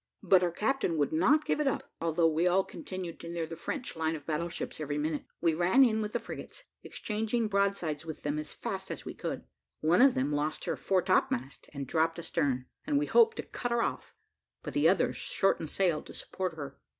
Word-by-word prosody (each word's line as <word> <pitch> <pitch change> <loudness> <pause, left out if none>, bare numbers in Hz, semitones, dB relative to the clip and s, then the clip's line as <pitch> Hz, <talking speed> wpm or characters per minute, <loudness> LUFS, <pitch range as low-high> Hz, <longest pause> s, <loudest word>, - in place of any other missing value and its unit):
But 190 -1 +5
our 180 - +2
captain 210 -1 0
would 145 0 +1
not 280 - +4
give - - 0
it 295 - +1
up, 270 - -2
although 165 0 +2
we 165 +2 +2
all 185 +2 +4
continued 185 -3 -7
to 170 - -7
near 170 -1 -2
the 165 +1 -7
French 250 - -4
line 160 0 0
of 150 -2 -9
battle 165 +2 -1
ships 170 - -5
every 145 -1 -2
minute 150 0 -2 0.2
we 165 -1 +3
ran 180 +11 +5
in 220 -2 +1
with 210 0 -3
the 240 - +1
frigates, - - -9 0.2
exchanging 220 +2 -2
broadsides 200 -7 0
with 160 -1 -7
them 150 +1 -1
as 155 - -5
fast - - -5
as - - -6
we - - -5
could. - - -4 0.4
One 165 +6 +4
of 270 -1 +6
them 135 +3 0
lost 150 +1 -1
her - - -1
fore 190 -2 +1
topmast, 135 -7 0
and 140 -2 -5
dropped 165 +4 +1
astern, 135 -6 -1 0.2
and 295 -1 +1
we 295 - +2
hoped 460 -1 +5
to - - -3
cut 245 - -4
her 235 -1 +2
off, - - -4 0.5
but - - -5
the - - +4
others - - +2
shortened 165 -5 +1
sail 175 -4 +1
to - - -12
support 185 -2 -4
her. 140 -3 -7
170 Hz, 220 wpm, -30 LUFS, 155-210 Hz, 0.5 s, of